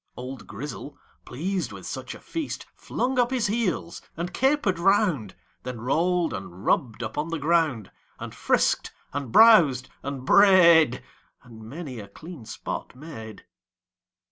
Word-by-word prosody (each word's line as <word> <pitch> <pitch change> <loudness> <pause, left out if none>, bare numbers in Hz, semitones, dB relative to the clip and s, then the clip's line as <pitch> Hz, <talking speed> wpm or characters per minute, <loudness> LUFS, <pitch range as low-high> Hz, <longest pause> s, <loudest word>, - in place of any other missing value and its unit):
Old 130 +1 -8
Grizzle, 140 +5 -8 0.3
pleased 170 - -3
with 95 -2 -10
such 130 -1 -6
a - - -12
feast, 325 -3 -5
Flung 255 +1 -2
up 245 -1 +3
his 255 -3 0
heels, 205 -5 -2 0.2
and 175 +2 -4
caper'd 265 - +1
round, 180 - +2 0.3
Then 125 -2 -6
roll'd 165 +7 +1
and 95 0 -8
rubb'd 120 -2 0
upon 150 +8 -3
the 165 - -2
ground, 155 - 0 0.3
And - - -8
frisk'd - - +1 0.2
and 140 -5 -4
browsed 165 - +6
and 135 -2 -6
bray'd, 170 - +6 0.4
And 115 -3 -14
many 130 +2 -8
a 100 - -9
clean 155 - -11
spot - - -6
made. 125 -7 -10
150 Hz, 140 wpm, -25 LUFS, 125-185 Hz, 0.4 s, browsed